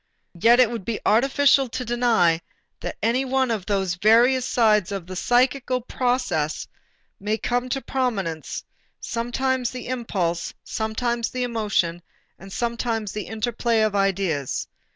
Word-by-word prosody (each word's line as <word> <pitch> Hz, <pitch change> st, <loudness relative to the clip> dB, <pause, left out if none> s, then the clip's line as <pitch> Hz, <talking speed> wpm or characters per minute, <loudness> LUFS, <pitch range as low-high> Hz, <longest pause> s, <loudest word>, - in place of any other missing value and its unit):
Yet 230 Hz, +8 st, +4 dB
it 245 Hz, -3 st, +5 dB
would 230 Hz, -4 st, -4 dB
be 225 Hz, +2 st, -3 dB
artificial 270 Hz, +3 st, +4 dB
to 255 Hz, +1 st, -4 dB
deny 230 Hz, -9 st, +2 dB, 0.4 s
that -, -, -5 dB
any 245 Hz, +4 st, +2 dB
one 265 Hz, -1 st, +1 dB
of 210 Hz, -5 st, -3 dB
those 195 Hz, -3 st, 0 dB
various 235 Hz, +7 st, +4 dB
sides 210 Hz, -5 st, +3 dB
of 195 Hz, -4 st, -4 dB
the 185 Hz, +1 st, -8 dB
psychical 255 Hz, +4 st, +2 dB
process 245 Hz, -, -1 dB, 0.5 s
may 210 Hz, +2 st, -1 dB
come 245 Hz, +2 st, -1 dB
to 270 Hz, +2 st, -1 dB
prominence, 195 Hz, -, -2 dB, 0.4 s
sometimes 245 Hz, +1 st, -1 dB
the 250 Hz, -1 st, -7 dB
impulse, 195 Hz, -9 st, -2 dB
sometimes 230 Hz, +2 st, -2 dB
the 255 Hz, 0 st, -3 dB
emotion, 205 Hz, -8 st, 0 dB, 0.4 s
and 195 Hz, 0 st, -12 dB
sometimes 235 Hz, -2 st, -2 dB
the 210 Hz, -, -5 dB
interplay 225 Hz, +1 st, 0 dB
of 215 Hz, -2 st, +1 dB
ideas. 195 Hz, -8 st, 0 dB
230 Hz, 135 wpm, -23 LUFS, 195-250 Hz, 0.5 s, it